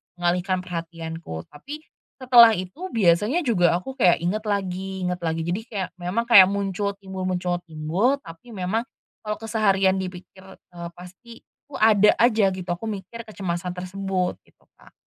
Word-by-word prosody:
mengalihkan 180 +1 0
perhatianku. 165 - -6
Tapi, 290 - -9 0.4
setelah 235 -3 +8
itu 185 - -6
biasanya 215 - +2
juga 175 -9 +3
aku 260 +10 -6
kayak 180 -2 +5
inget 210 +5 -1
lagi 190 -1 -3
inget 180 0 -2
lagi 165 -1 -2
jadi 175 +5 -2
kayak 195 -5 -4
memang 180 +7 -1
kayak 200 -6 +8
muncul 200 0 -2
timbul 190 -2 -6
muncul 180 -1 -1
timbul 165 - 0
tapi 170 +8 -12
memang, 190 +4 -1 0.5
kalau 210 0 -2
keseharian 200 -4 +2
dipikir, 185 0 -8
eee, 170 -1 -10
pasti 190 +7 -13
itu 290 - -26
ada 210 -2 +5
aja 225 -4 +4
gitu 185 -2 -7
aku 175 +6 -4
mikir 220 +3 -7
kecemasan 180 -4 -4
tersebut 185 0 -3
gitu - - -29 0.2
Kak. - - -19
190 Hz, 150 wpm, -24 LUFS, 175-215 Hz, 0.5 s, setelah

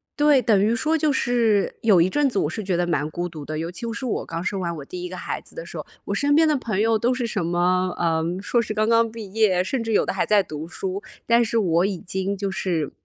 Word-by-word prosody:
对， 295 -2 +4
等 205 -5 +3
于 225 +2 +2
说 310 +7 +1
就 305 -1 +2
是 235 -6 +1
有 205 -6 +5
一 175 - +4
阵 290 +5 +2
子 205 - -4
我 150 - 0
是 215 +4 -5
觉 185 -2 0
得 175 - +1
蛮 150 -3 -1
孤 175 +2 -3
独 155 -4 -9
的， 155 0 -4
尤 165 +2 -3
其 230 +5 -5
是 260 - -5
我 240 - -2
刚 165 +1 -5
生 195 0 -2
完 170 -2 -2
我 140 - -8
第 180 +3 -7
1 180 - -4
个 185 - -7
孩 - - -4
子 - - -12
的 - - -6
时 - - -8
候， - - -6 0.2
我 - - -2
身 290 0 +2
边 320 0 +5
的 305 - +3
朋 215 -6 -2
友 225 0 +3
都 235 +3 +1
是 250 -1 -2
什 210 -5 -2
么， 180 +1 +1
嗯， 165 +1 0
硕 235 +3 +1
士 215 - -5
刚 215 +1 +1
刚 230 -1 +3
毕 215 -4 -9
业， 200 -5 +3
甚 240 +5 -2
至 225 -1 -2
有 - - +3
的 - - -2
还 190 - 0
在 210 -2 +4
读 155 -1 -7
书， 190 +3 -4 0.2
但 235 0 +4
是 230 0 -1
我 175 -3 +2
已 195 - -3
经 190 +2 -3
就 195 -1 -2
是， 170 -6 -2
200 Hz, 300 characters per minute, -23 LUFS, 175-230 Hz, 0.2 s, 有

